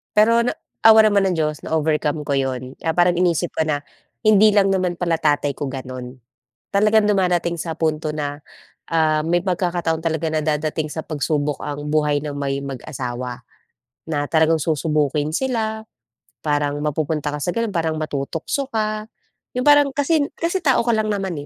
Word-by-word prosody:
Pero 225 +2 +5
na - - -1 0.3
awa 220 0 +9
naman 205 -2 +3
ng 185 - 0
diyos 155 -2 -1
na-overcome 155 -1 0
ko 145 - -4
'yon. 130 -1 -3
Ah 160 0 0
parang, 175 0 +3
iniisip 175 -1 +1
ko 160 - -1
na 145 -2 -1 0.4
hindi 215 -1 +6
lang 195 -1 +4
naman 185 -2 0
pala 170 -2 -1
tatay 145 -2 +1
ko 140 +1 -5
gano'n. 130 -1 -7 0.6
Talagang 215 +1 +4
dumadating 180 -4 +1
sa 165 -1 -5
punto 155 -1 0
na, 145 -1 -4 0.5
ah, 155 -2 +2
may 170 +3 +1
pagkakataon 175 -3 -1
talaga 160 -1 -1
na 155 -1 0
dadating 155 0 -1
sa 160 +1 -5
pagsubok 150 -1 -1
ang 145 0 -5
buhay 150 -1 +2
ng 145 -1 -4
may 140 -1 -2
mag-asawa, 125 -2 -5 0.7
na 145 -2 -1
talagang 160 0 +4
susubukin 150 -1 0
sila. 220 -3 -1 0.6
Parang, 145 -1 0
mapupunta 150 0 -1
ka 150 - -3
sa 175 - -1
gano'n, 230 -3 -1
parang 160 -2 0
matutukso 155 - -3
ka. 215 -1 -2 0.5
Yong 250 - 0
parang 290 -1 +6
kasi 295 +3 +2 0.2
kasi 340 +3 -1
tao 275 -9 +2
ka 235 - +1
lang 220 -1 +1
naman, 190 -7 -3
160 Hz, 165 wpm, -21 LUFS, 145-195 Hz, 0.7 s, awa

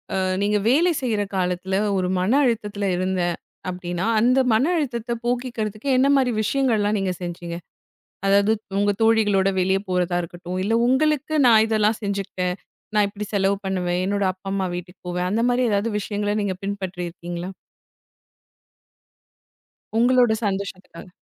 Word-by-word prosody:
அ - - +1 0.2
நீங்க 210 +1 +2
வேலை 340 +7 +4
செய்ற 225 -5 0
காலத்துல 185 +1 -1 0.2
ஒரு 180 -1 0
மன 185 +5 +1
அழுத்தத்துல 210 -4 -1
இருந்தேன் 180 -2 0 0.3
அப்டின்னா 180 +1 -3
அந்த 250 +4 +4
மன 220 - +3
அழுத்தத்த 240 -6 -3
போக்கிக்கறதுக்கு 240 -1 -2
என்ன 265 +2 +4
மாரி 260 -3 +2
விஷயங்கள்லாம் 215 -4 +1
நீங்கச் 185 -2 -2
செஞ்சீங்க? 175 -1 -5 0.7
அதாவது 200 +2 +4 0.3
உங்க 205 0 +3
தோழிகளோட 210 -4 +3
வெளிய 190 +1 +2
போறதா 180 -1 0
இருக்கட்டும், 175 +2 -6
இல்ல 220 +4 0
உங்களுக்கு 300 +3 +1
நான் 220 -2 +6
இதெல்லாம் 215 0 +1
செஞ்சிக்குட்டேன், 195 -3 -2 0.4
நான் 205 -1 +4
இப்டி 205 +1 -6
செலவு 195 0 +2
பண்ணுவேன், 180 -2 -1
என்னோட 200 0 0
அப்பா 190 +1 -9
அம்மா 190 -1 0
வீட்டுக்குப் 180 +1 -9
போவேன் 180 +1 -1
அந்த 230 +2 +1
மாரி 245 +1 +2
ஏதாவது 205 +3 0
விஷயங்கள 205 0 -2
நீங்கப் 190 -1 -3
பின்பற்றி 190 -3 -4
இருக்கீங்களா? 175 +1 -6 2.5
உங்களோட 245 -1 +4
சந்தோஷத்துக்காக? 190 -3 -4
200 Hz, 135 wpm, -23 LUFS, 185-225 Hz, 2.5 s, நான்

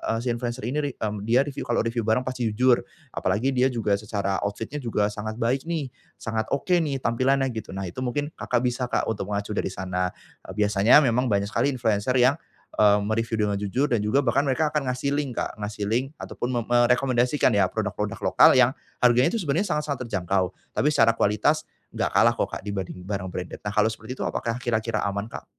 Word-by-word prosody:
eee, - - -1
si - - -4
influencer 120 +1 -4
ini, 140 +5 -1 0.2
mmm, 105 -1 -3
dia 120 +4 +4
review 140 -1 -6
kalo 120 - +1
review 115 +1 -1
barang 110 +3 +2
pasti 130 -2 -2
jujur 125 +3 +3 0.3
apalagi 130 +6 0
dia 130 0 +3
juga 110 -5 0
secara 100 -2 -2
outfit-nya 115 +8 -5
juga 105 -5 0
sangat 110 +1 -5
baik 125 +5 0
nih, 155 -6 -2 0.3
sangat 110 -1 -3
oke 140 - -5
nih 145 -4 -1
tampilannya 130 +3 +1
gitu, 110 -4 -7
nah 95 - -4
itu 90 +7 -7
mungkin 145 +4 -2
Kakak, 125 0 0
bisa 125 0 -1
Kak, - - 0
untuk 100 -3 -4
mengacu 100 0 -3
dari - - -1
sana, 90 -1 -2 0.4
eee, - - -7
biasanya 105 +6 +5
memang 125 0 +2
banyak 100 -1 +1
sekali - - +1
influencer 115 -1 0
yang, 130 +3 +5 0.4
eee, 105 -1 +5
me-review 115 +2 -1
dengan 100 -1 -1
jujur 105 +8 0
dan 115 -3 +2
juga 105 +6 +3
bahkan 130 +3 +2
mereka 150 +3 +1
akan 150 -3 -1
ngasih 140 +3 -1
link 140 -5 -3
Kak, - - -4
ngasih 105 0 -4
link 130 +6 -1
atau - - -8
pun 120 - -1
me 120 - +1
merekomendasikan 125 +2 +3
ya 100 - +5
produk-produk 105 -1 -3
lokal - - +8
yang 130 -1 +6 0.3
harganya 125 +6 +4
itu - - 0
sebenernya 165 +5 0
sangat-sangat 145 -4 -2
terjangkau 95 -2 0 0.3
tapi - - +2
secara 115 -4 +4
kualitas 145 +10 +2 0.3
enggak - - 0
kalah - - +5
kok - - -1
Kak, - - -4
dibanding 95 -3 -5
barang 95 -1 -3
branded 90 -1 -6
nah 105 - -1
kalau 105 0 +3
seperti 110 +3 -8
itu - - -1
apakah 115 -1 -2
kira-kira 115 -3 -1
aman, 100 +1 -3
Kak? - - -8
115 Hz, 205 wpm, -25 LUFS, 105-130 Hz, 0.4 s, lokal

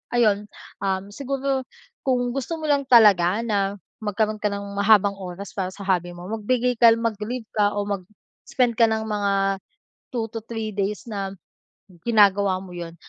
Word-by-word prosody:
ayun, 210 -3 +3 0.3
um, 195 +1 -2
siguro 270 +1 -2 0.4
kung 245 -2 +1
gusto 275 +5 -3
mo - - -4
lang 280 -1 +2
talaga 205 -4 +6
na 200 -2 0 0.2
magkaroon 215 0 0
ka - - -4
ng 200 0 -6
mahabang 200 -1 +4
oras 190 +1 -7
para 190 -2 -2
sa 200 - -11
hobby 175 -2 0
mo, 175 +2 -9
magbigay 240 +3 0
ka 235 0 +8
l - - -2
mag-leave 230 +2 -3
ka 205 0 +3
o 205 - +1
mag-spend 210 - -3
ka 230 - +6
ng 220 0 -1
mga 205 -1 0 0.8
2 230 -3 -2
to 225 - -4
3 225 -2 -4
days 205 +4 -2
na 195 -3 -4 0.8
ginagawa 200 -4 +4
mo 180 -2 -11
yun 170 -1 -7
210 Hz, 165 wpm, -23 LUFS, 200-235 Hz, 0.8 s, ka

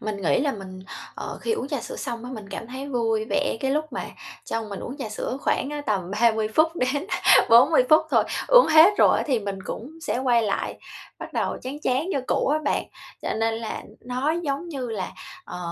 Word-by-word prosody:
Mình 205 -2 -4
nghĩ 180 - +2
là 285 0 +1
mình, 185 -3 -9 0.3
ờ, - - -6
khi 455 - -1
uống 450 - -3
trà - - -2
sữa - - -7
xong 235 - -5
á, 250 - -7
mình 215 -6 -8
cảm 200 +3 -6
thấy 260 +3 -7
vui 225 -4 0
vẻ 200 - +1
cái 270 - 0
lúc 305 +2 -1
mà - - -4 0.4
trong 225 -1 -3
mình 200 -2 -6
uống 255 - -6
trà 265 -6 -5
sữa 220 +4 -4
khoảng 275 - 0
á 295 - -4
tầm 190 -4 -1
30 220 +1 +2
phút 320 +2 +3
đến 280 +6 -1 0.4
40 255 +5 +7
phút 310 - +7
thôi, - - +4 0.2
uống - - +8
hết 320 +4 +8
rồi - - +5
á - - 0
thì 265 -5 +2
mình 200 -2 -4
cũng 245 +6 -6
sẽ 285 - -2
quay 245 -3 +3
lại, 205 -2 -2 0.4
bắt - - -8
đầu - - -1
chán 270 +3 -5
chán 275 +4 0
như 275 - 0
cũ - - +1
á 300 +2 +2
bạn. - - 0 0.4
Cho - - -1
nên 225 0 0
là 225 0 -5 0.2
nó 255 +4 -1
giống 285 +3 -3
như 270 -6 -4
là, 210 -5 -4 0.3
ờ, - - -7
250 Hz, 225 wpm, -24 LUFS, 220-285 Hz, 0.4 s, uống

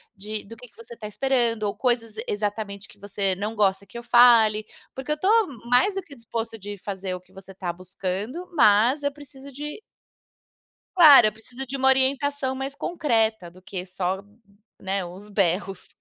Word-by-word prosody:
de 210 +2 -6
do 230 +3 -11
que 250 +2 -13
que - - -35
você 230 +1 -12
está 215 - -10
esperando, 235 -1 0
ou 205 - -1
coisas 235 -4 -1
exatamente 205 -1 -3
que - - -20
você 200 -1 -2
não 210 +4 -4
gosta 200 -1 +1
que 235 - -11
eu 235 - -7
fale, 230 -3 +5 0.3
porque 265 +3 -5
eu - - +2
estou 420 +6 +3 0.2
mais 385 +11 +3
do 390 - -2
que 305 -5 -15
disposto 230 -1 -5
de 205 +1 -7
fazer 190 -1 -5
o - - -7
que 185 +1 -27
você 195 0 -12
está 180 -2 -4
buscando, 190 - -5
mas 235 +3 +4
eu 285 - 0
preciso 280 -1 -13
de" 295 +7 -7 1.2
Claro. 290 -10 +9
"Eu - - 0
preciso 245 +4 -8
de 270 +2 -5
uma 265 0 +2
orientação 265 0 +2
mais 270 +1 -5
concreta 225 - 0
do 185 +1 -18
que 185 -1 -6
só, 185 +1 -3 0.6
né, 195 0 -2
os 190 +4 -11
berros". 195 -1 -1
225 Hz, 185 wpm, -24 LUFS, 195-265 Hz, 1.2 s, Claro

